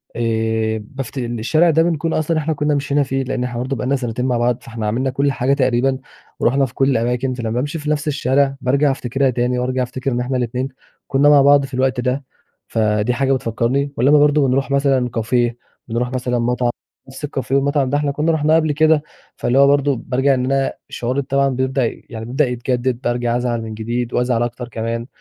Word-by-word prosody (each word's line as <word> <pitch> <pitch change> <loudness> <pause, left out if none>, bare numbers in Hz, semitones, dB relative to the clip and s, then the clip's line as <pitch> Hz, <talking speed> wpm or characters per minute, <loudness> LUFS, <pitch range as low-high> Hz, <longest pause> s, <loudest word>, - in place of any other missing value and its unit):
آآ، 110 -1 0
بافت 135 +3 -7
الشارع 120 +8 +1
ده 160 +1 +4
بنكون 165 -1 -1
أصلًا 155 +1 0
إحنا 155 +1 0
كنا 150 0 0
مشينا 140 0 +1
فيه، 135 0 -2
لأن 130 -1 -2
إحنا 120 -1 -4
برضه 130 +2 -2
بقى 115 - -4
لنا 140 +2 +1
سنتين 125 -1 -3
مع 125 -2 +1
بعض، 120 0 +1
فإحنا 110 -2 -5
عملنا 130 +5 0
كل 140 +2 +1
حاجة 135 +2 +1
تقريبًا، 130 -1 +1 0.4
ورُحنا 135 +2 +2
في 120 - -9
كل 135 0 +2
الأماكن 125 +2 0
فلمّا 115 -3 -4
بامشي 145 +7 -2
في 150 0 -4
نفس 150 0 -1
الشارع 140 -1 +1
بارجع 140 +3 +2
أفتكرها 135 +1 0
تاني، 125 0 0
وأرجع 130 0 0
أفتكر 130 +2 -3
إن 120 - -1
إحنا 130 +1 -1
الإتنين 125 +2 -2 0.4
كنا 140 +2 +4
مع 145 -1 +7
بعض 140 0 +5
في 135 - -13
الوقت 130 0 +1
ده، 125 +3 -1 0.4
فدي 110 +1 +1
حاجة 135 +1 +1
بتفكّرني. 130 +3 -1
ولمَّا 145 +5 +5
برضه 145 -1 +4
بنروح 135 +2 0
مثلًا 135 -3 +2
Cafe 120 +1 +1 0.4
بنروح 120 +2 -2
مثلًا 125 -1 -1
مطعم، 120 +1 0 0.4
نفس 135 +3 -6
الCafe 135 -3 -5
والمطعم 140 0 +2
ده 145 - +1
إحنا 145 -1 0
كنا 150 +3 0
رُحناه 155 0 +2
قبل 155 -2 +2
كده، 155 0 +3 0.3
فاللي 130 +3 +1
هو 140 - +7
برضه 140 -1 +3
بارجع 135 +2 +2
إن 125 -1 0
أنا 135 0 0 0.2
شعوري 125 +4 -2
طبعًا 140 0 +1
بيبدأ 130 0 0 0.2
يعني 110 -1 -6
بيبدأ 135 +4 +1
يتجدّد، 125 0 -1
بارجع 120 -1 0
أزعل 120 -2 -1
من 110 -1 -6
جديد، 115 +2 -3
وأزعل 120 -1 +1
أكتر 120 +1 -5
كمان. 115 +1 -4
130 Hz, 200 wpm, -19 LUFS, 120-140 Hz, 0.4 s, مع